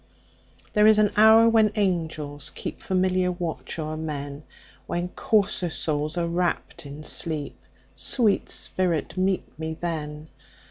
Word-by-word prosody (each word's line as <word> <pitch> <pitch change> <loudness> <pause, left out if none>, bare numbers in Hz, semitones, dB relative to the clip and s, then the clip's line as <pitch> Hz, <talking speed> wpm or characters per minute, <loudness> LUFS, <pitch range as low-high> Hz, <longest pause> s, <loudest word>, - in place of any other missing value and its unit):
There 210 -1 +5
is 215 -1 +6
an 210 -1 +4
hour 220 +2 +7
when 220 -2 +4
angels 160 -7 -2
keepFamiliar 185 -1 -1
watch 170 -1 -4
o'er 155 -1 -3
men, 145 -2 -5 0.5
When 175 +1 -2
coarser 200 -4 +1
souls 150 +1 -2
are 170 -1 0
wrapp'd 170 -3 -2
in 145 +2 -9
sleep—Sweet 165 - -1
spirit, 175 -5 -1
meet 185 -4 -1
me 160 0 -4
then! 155 -2 -4
170 Hz, 120 wpm, -25 LUFS, 155-195 Hz, 0.5 s, hour